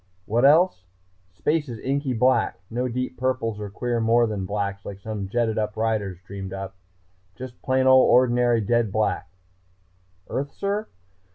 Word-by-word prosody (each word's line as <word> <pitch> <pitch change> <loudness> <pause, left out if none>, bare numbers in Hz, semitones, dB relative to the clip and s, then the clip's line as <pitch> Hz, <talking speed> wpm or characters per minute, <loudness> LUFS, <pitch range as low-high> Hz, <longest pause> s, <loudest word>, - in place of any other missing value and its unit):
What 120 +4 +2
else?... 150 - +4 0.4
Space 150 - -1
is 115 - -6
inky 135 +2 -1
black 125 +3 +2
no 125 +2 -1
deep 125 +1 -4
purples 125 -4 -1
or 105 -1 -5
queer 120 +3 -2
more 115 +1 +4
than 100 -4 -3
blacks 100 -1 -3
like 100 -1 -8
some 105 -1 -5
jetted 115 0 0
up 105 0 -3
writers 110 -4 -1
dreamed 95 -1 -7
up 95 0 -6 0.6
just 125 +1 -9
plain 130 -1 +1
old 130 0 +6
ordinary 120 -2 +4
dead 115 0 +1
black. 105 -4 -1 1.0
Earth, 140 +1 -3
sir?... 205 +2 -2
115 Hz, 155 wpm, -24 LUFS, 105-130 Hz, 1.0 s, old